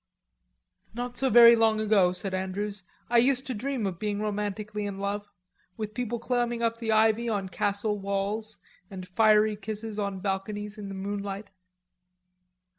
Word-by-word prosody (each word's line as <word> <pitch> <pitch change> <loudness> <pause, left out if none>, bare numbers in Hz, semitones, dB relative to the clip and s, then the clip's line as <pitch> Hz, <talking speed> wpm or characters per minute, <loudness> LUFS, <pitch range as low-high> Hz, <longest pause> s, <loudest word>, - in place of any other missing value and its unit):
"Not 245 0 -4
so 265 +1 +1
very 235 0 +9
long 225 -1 +3
ago," 205 -4 +4
said 185 +1 -3
Andrews, 195 +1 -2 0.2
"I 240 0 +4
used 260 +2 +3
to 260 - -3
dream 250 0 -2
of 185 -3 -3
being 210 -1 -2
romantically 210 0 -3
in 200 -1 -5
love, 205 +1 -3 0.5
with 215 -1 -4
people 240 0 -2
climbing 240 0 -1
up 230 0 0
the 225 -1 -1
ivy 220 +2 +3
on 200 -3 -2
castle 205 +2 -1
walls, 200 +2 -2 0.3
and 185 -2 -8
fiery 215 +1 +4
kisses 215 +1 -6
on 200 -2 -2
balconies 205 +2 -3
in 205 - -6
the 195 - -6
moonlight." 200 +1 -5
210 Hz, 155 wpm, -28 LUFS, 200-225 Hz, 0.5 s, very